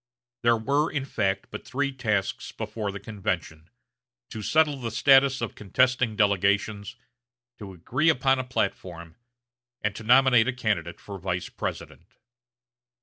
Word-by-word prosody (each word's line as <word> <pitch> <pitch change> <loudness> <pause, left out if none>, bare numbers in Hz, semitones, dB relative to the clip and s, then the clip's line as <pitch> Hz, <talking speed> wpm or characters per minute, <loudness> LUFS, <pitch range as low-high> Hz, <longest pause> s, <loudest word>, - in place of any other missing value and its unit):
There 120 -1 +3
were, 140 +7 0
in 140 -3 -2
fact, 100 -7 -2
but - - -7
three 140 +1 -2
tasks 110 -7 -2
before 105 -3 -4
the 100 - -7
convention 90 -6 -4 0.6
to 110 - -6
settle 150 +5 +2
the 120 -3 -4
status 135 +3 +4
of 115 - -3
contesting 125 +2 +1
delegations, 100 +1 +1 0.6
to 100 -3 -8
agree 130 - 0
upon 135 -3 +2
a - - -1
platform, 90 -8 -4 0.7
and 105 -1 -1
to 110 - -8
nominate 125 0 +5
a 130 - 0
candidate 100 -9 -2
for 100 -1 -9
Vice 90 -1 -3
President. - - -6
110 Hz, 140 wpm, -26 LUFS, 100-130 Hz, 0.7 s, nominate